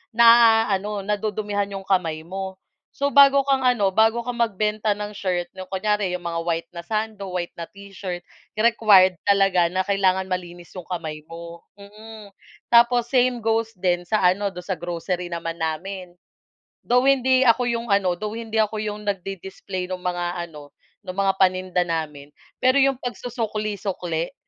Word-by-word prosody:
naaano, 225 Hz, -4 st, +5 dB
nadudumihan 205 Hz, -1 st, -2 dB
yung 195 Hz, -1 st, -6 dB
kamay 165 Hz, -5 st, 0 dB
mo. 190 Hz, +1 st, -6 dB, 0.4 s
So, 280 Hz, 0 st, 0 dB
bago 280 Hz, -1 st, +6 dB
kang 270 Hz, -1 st, +2 dB
ano, 225 Hz, -7 st, +2 dB
bago 225 Hz, +2 st, +3 dB
ka 245 Hz, -, -2 dB
magbenta 215 Hz, -2 st, 0 dB
ng 210 Hz, 0 st, -5 dB
shirt 180 Hz, -3 st, -2 dB
yung 185 Hz, -1 st, -9 dB
kunyari 205 Hz, 0 st, 0 dB
yung 175 Hz, -, -18 dB
mga 165 Hz, 0 st, -2 dB
white 165 Hz, 0 st, -2 dB
na 170 Hz, -, -6 dB
sando, 215 Hz, 0 st, -4 dB
white 180 Hz, -1 st, -4 dB
na 170 Hz, -1 st, -8 dB
t-shirt, 195 Hz, -3 st, -8 dB, 0.3 s
required 215 Hz, -5 st, +5 dB
talaga 195 Hz, -4 st, +3 dB
na 185 Hz, +1 st, -1 dB
kailangan 190 Hz, -2 st, +1 dB
malinis 175 Hz, -2 st, -6 dB
yung 180 Hz, -3 st, -9 dB
kamay 160 Hz, -4 st, -5 dB
mo. 170 Hz, 0 st, -9 dB, 0.2 s
Mm. 210 Hz, +1 st, -12 dB, 0.4 s
Tapos 240 Hz, 0 st, +5 dB
same 250 Hz, -1 st, +3 dB
goes 225 Hz, 0 st, 0 dB
din 175 Hz, -1 st, +1 dB
sa 195 Hz, +5 st, -1 dB
ano, 200 Hz, +3 st, +2 dB
do'n 180 Hz, -1 st, -10 dB
sa 190 Hz, -, -1 dB
grocery 175 Hz, +1 st, -4 dB
naman 165 Hz, -1 st, -5 dB
namin. 175 Hz, +3 st, -4 dB, 0.7 s
Though 250 Hz, +2 st, +2 dB
hindi 260 Hz, -1 st, +4 dB
ako 240 Hz, +2 st, +4 dB
yung 235 Hz, -1 st, -2 dB
ano, 200 Hz, -3 st, +2 dB
though 215 Hz, +1 st, -4 dB
hindi 225 Hz, -1 st, -3 dB
ako 215 Hz, 0 st, +1 dB
yung 210 Hz, 0 st, -5 dB
nagdi-display 190 Hz, -1 st, -5 dB
ng 185 Hz, -1 st, -6 dB
mga 175 Hz, -1 st, -2 dB
ano, 145 Hz, -1 st, -13 dB, 0.3 s
ng 185 Hz, -, -5 dB
mga 195 Hz, -1 st, +2 dB
paninda 185 Hz, -1 st, +2 dB
namin, 150 Hz, -4 st, -4 dB, 0.3 s
pero 255 Hz, +1 st, +3 dB
yung 270 Hz, -2 st, +3 dB
pagsusukli-sukli? 210 Hz, -8 st, -4 dB
195 Hz, 155 wpm, -23 LUFS, 180-220 Hz, 0.7 s, bago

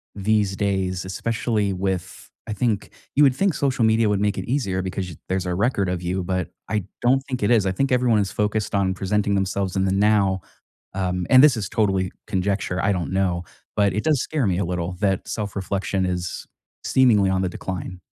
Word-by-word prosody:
these 105 Hz, -1 st, +1 dB
days, 95 Hz, -2 st, -1 dB
especially 110 Hz, +1 st, -1 dB
with, 95 Hz, -1 st, -4 dB, 0.2 s
I 110 Hz, -, -3 dB
think 105 Hz, -1 st, -1 dB, 0.3 s
you 145 Hz, -, +6 dB
would 135 Hz, -3 st, +5 dB
think 195 Hz, +5 st, +2 dB
social 135 Hz, -4 st, 0 dB
media 110 Hz, 0 st, +3 dB
would 105 Hz, -1 st, +1 dB
make 105 Hz, 0 st, +1 dB
it -, -, -3 dB
easier 110 Hz, -8 st, -1 dB
because 95 Hz, 0 st, -4 dB
you 85 Hz, -, -9 dB
there's 95 Hz, 0 st, -1 dB
a 90 Hz, -, -1 dB
record 100 Hz, 0 st, +1 dB
of 90 Hz, -1 st, -2 dB
you, 90 Hz, +1 st, -2 dB
but 90 Hz, -1 st, -2 dB, 0.2 s
I 105 Hz, -2 st, 0 dB, 0.2 s
don't 130 Hz, +2 st, +4 dB
think 130 Hz, -5 st, -3 dB
it 100 Hz, -, +2 dB
is. 110 Hz, -5 st, +4 dB
I 95 Hz, -, +1 dB
think 135 Hz, +9 st, 0 dB
everyone 125 Hz, -3 st, +3 dB
is 100 Hz, -2 st, -1 dB
focused 105 Hz, 0 st, -1 dB
on 95 Hz, -2 st, +2 dB
presenting 100 Hz, +2 st, 0 dB
themselves 95 Hz, 0 st, -1 dB
in 95 Hz, 0 st, +1 dB
the 95 Hz, -, +1 dB
now, 100 Hz, -1 st, +2 dB, 0.5 s
um, 90 Hz, -2 st, -1 dB
and 130 Hz, +2 st, +8 dB
this 140 Hz, -6 st, +6 dB
is 100 Hz, -5 st, -3 dB
totally 95 Hz, -4 st, +1 dB, 0.2 s
conjecture, 95 Hz, -2 st, -1 dB
I -, -, +3 dB
don't 90 Hz, 0 st, -3 dB
know, 90 Hz, -2 st, 0 dB, 0.3 s
but 100 Hz, -2 st, +2 dB
it 105 Hz, -, -1 dB
does 155 Hz, -4 st, +2 dB
scare 145 Hz, -8 st, -1 dB
me 90 Hz, -2 st, +1 dB
a 95 Hz, -, 0 dB
little 90 Hz, 0 st, -2 dB
that 95 Hz, -3 st, 0 dB
self-reflection 100 Hz, -2 st, -2 dB
is 90 Hz, -1 st, -3 dB, 0.4 s
seemingly 110 Hz, -7 st, +4 dB
on 95 Hz, 0 st, +1 dB
the 95 Hz, -, 0 dB
decline. 90 Hz, 0 st, -6 dB
100 Hz, 205 wpm, -23 LUFS, 95-110 Hz, 0.5 s, and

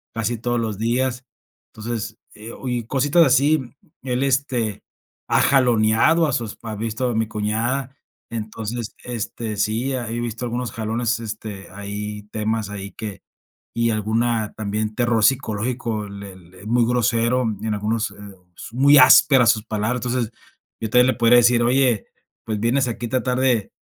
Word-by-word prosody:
casi 115 Hz, +1 st, -1 dB
todos 120 Hz, +1 st, -1 dB
los 110 Hz, -3 st, -3 dB
días, 125 Hz, +2 st, -1 dB, 0.5 s
entonces, 110 Hz, 0 st, -5 dB, 0.2 s
eh, 110 Hz, +2 st, -9 dB
oye, 125 Hz, -2 st, -4 dB
y -, -, -6 dB
cositas 145 Hz, +6 st, +3 dB
así 140 Hz, +3 st, +3 dB, 0.4 s
él 130 Hz, 0 st, -1 dB
este 130 Hz, -6 st, -1 dB, 0.5 s
ha -, -, +3 dB
jaloneado 125 Hz, +5 st, +4 dB
a 145 Hz, -, -1 dB
sus 115 Hz, -5 st, -3 dB
pa 110 Hz, -2 st, -7 dB
he -, -, -6 dB
visto 115 Hz, +3 st, -2 dB
a 120 Hz, -, -2 dB
mi 110 Hz, 0 st, 0 dB
cuñada. 115 Hz, +6 st, -2 dB, 0.4 s
Entonces, 110 Hz, +1 st, -5 dB
este, 115 Hz, -2 st, -5 dB
sí, 110 Hz, +6 st, 0 dB
he 120 Hz, -2 st, -3 dB
visto 120 Hz, 0 st, -4 dB
algunos 120 Hz, 0 st, -3 dB
jalones, 115 Hz, 0 st, -1 dB
este, 105 Hz, -3 st, -7 dB
ahí 105 Hz, +1 st, -6 dB
temas, 110 Hz, -1 st, -2 dB
ahí 100 Hz, -1 st, -6 dB
que, 105 Hz, -4 st, -8 dB, 0.5 s
y 115 Hz, 0 st, +2 dB
alguna 110 Hz, +1 st, 0 dB
también 105 Hz, 0 st, -2 dB
terror 120 Hz, -2 st, +1 dB
psicológico, 115 Hz, -3 st, 0 dB
le 100 Hz, -1 st, -9 dB
le 90 Hz, +1 st, -17 dB
es 105 Hz, -, -10 dB
muy 120 Hz, 0 st, +3 dB
grosero, 120 Hz, +1 st, +1 dB, 0.2 s
y 110 Hz, -, -4 dB
en 105 Hz, -, 0 dB
algunos, 105 Hz, +1 st, -1 dB
eh, -, -, -15 dB, 0.6 s
muy 140 Hz, +3 st, +6 dB
áspera 130 Hz, 0 st, +7 dB
sus 110 Hz, -2 st, +3 dB
palabras. 110 Hz, +3 st, -1 dB
Entonces, 120 Hz, -2 st, -1 dB, 0.5 s
yo 110 Hz, -, -2 dB
todavía 125 Hz, +3 st, +5 dB
le -, -, -14 dB
podría 120 Hz, +1 st, +5 dB
decir: 120 Hz, 0 st, +4 dB
"Oye, 125 Hz, -2 st, +2 dB, 0.4 s
pues, 110 Hz, -2 st, -2 dB
vienes 125 Hz, +4 st, +1 dB
aquí 120 Hz, 0 st, -4 dB
a -, -, -10 dB
tratar 125 Hz, 0 st, 0 dB
de 125 Hz, -6 st, +1 dB
115 Hz, 165 wpm, -22 LUFS, 110-125 Hz, 0.6 s, áspera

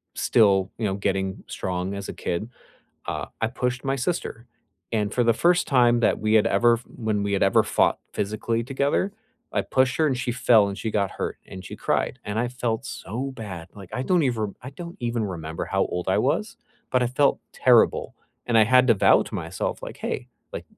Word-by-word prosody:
still, 95 Hz, -4 st, +3 dB
you 115 Hz, -, -2 dB
know, 95 Hz, -2 st, 0 dB
getting 95 Hz, -1 st, -2 dB
strong 90 Hz, +1 st, -3 dB
as 100 Hz, 0 st, -6 dB
a -, -, -4 dB
kid, 90 Hz, +6 st, -3 dB, 0.6 s
uh, -, -, -3 dB
I 110 Hz, -, +1 dB
pushed 125 Hz, +1 st, -2 dB
my 135 Hz, 0 st, 0 dB
sister, 130 Hz, -4 st, -3 dB, 0.5 s
and 105 Hz, -2 st, 0 dB
for 125 Hz, -, +2 dB
the 115 Hz, -, +5 dB
first 175 Hz, +7 st, +3 dB
time 120 Hz, -3 st, +4 dB
that -, -, +2 dB
we 110 Hz, 0 st, +1 dB
had 110 Hz, -, +5 dB
ever 120 Hz, +4 st, +4 dB
f 115 Hz, +1 st, -6 dB
when 110 Hz, -3 st, -2 dB
we 100 Hz, 0 st, -1 dB
had 100 Hz, -, 0 dB
ever 95 Hz, -, +5 dB
fought -, -, +2 dB, 0.2 s
physically 110 Hz, +3 st, -1 dB
together, 140 Hz, -, 0 dB, 0.4 s
I -, -, +1 dB
pushed 130 Hz, 0 st, +1 dB
her 160 Hz, -, +4 dB
and 135 Hz, -4 st, +1 dB
she 125 Hz, -1 st, -2 dB
fell 115 Hz, -4 st, +4 dB
and 100 Hz, +1 st, -5 dB
she 110 Hz, +3 st, -3 dB
got 100 Hz, -3 st, 0 dB
hurt -, -, -4 dB
and 95 Hz, 0 st, -9 dB
she -, -, -8 dB
cried, -, -, -1 dB
and 105 Hz, +1 st, -3 dB
I 120 Hz, +1 st, 0 dB
felt 120 Hz, -3 st, -3 dB
so 125 Hz, +7 st, -5 dB
bad, 95 Hz, -7 st, -7 dB
like, 100 Hz, -3 st, -12 dB
I 125 Hz, -, -1 dB
don't 180 Hz, +4 st, +2 dB
even 110 Hz, -7 st, -1 dB
I 130 Hz, -, -7 dB
don't 170 Hz, +4 st, -9 dB
even 120 Hz, -2 st, -1 dB
remember 80 Hz, -4 st, -5 dB
how -, -, +1 dB
old 90 Hz, 0 st, -4 dB
I -, -, +3 dB
was, -, -, 0 dB, 0.3 s
but 125 Hz, -, +2 dB
I -, -, +2 dB
felt 135 Hz, +3 st, +2 dB
terrible -, -, +3 dB, 0.3 s
and 115 Hz, -2 st, +3 dB
I 110 Hz, -, +7 dB
had 125 Hz, +3 st, +5 dB
to 115 Hz, -, +6 dB
vow 100 Hz, -, +5 dB
to -, -, -9 dB
myself, -, -, -4 dB
like, -, -, -9 dB
"Hey, -, -, -4 dB, 0.3 s
like -, -, -6 dB
115 Hz, 215 wpm, -24 LUFS, 100-125 Hz, 0.6 s, I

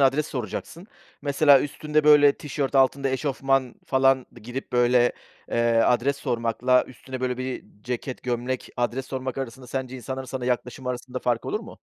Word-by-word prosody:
adres 140 Hz, +3 st, +3 dB
soracaksın. 135 Hz, -, -5 dB, 0.4 s
Mesela, 140 Hz, -1 st, +5 dB
üstünde 150 Hz, +1 st, -1 dB
böyle 145 Hz, -1 st, +7 dB
tişört, 140 Hz, -2 st, -4 dB
altında 135 Hz, +1 st, +3 dB
eşofman 135 Hz, -1 st, 0 dB
falan, 135 Hz, -1 st, +3 dB, 0.2 s
girip 125 Hz, +4 st, -6 dB
böyle, 120 Hz, 0 st, +4 dB, 0.4 s
eee, -, -, -1 dB, 0.3 s
adres 135 Hz, +3 st, +2 dB
sormakla, 125 Hz, 0 st, +1 dB
üstüne 130 Hz, +1 st, -8 dB
böyle 125 Hz, -1 st, -1 dB
bir 130 Hz, 0 st, -4 dB, 0.2 s
ceket, 125 Hz, +1 st, -4 dB
gömlek, 125 Hz, +1 st, -2 dB
adres 125 Hz, +2 st, -1 dB
sormak 130 Hz, 0 st, -4 dB
arasında 130 Hz, -1 st, -6 dB
sence 130 Hz, 0 st, -4 dB
insanların 130 Hz, +1 st, -5 dB
sana 130 Hz, 0 st, -4 dB
yaklaşımı 125 Hz, +1 st, -2 dB
arasında 125 Hz, 0 st, -4 dB
fark 120 Hz, -2 st, 0 dB
olur -, -, -2 dB
mu? -, -, -12 dB
130 Hz, 150 wpm, -25 LUFS, 125-135 Hz, 0.4 s, böyle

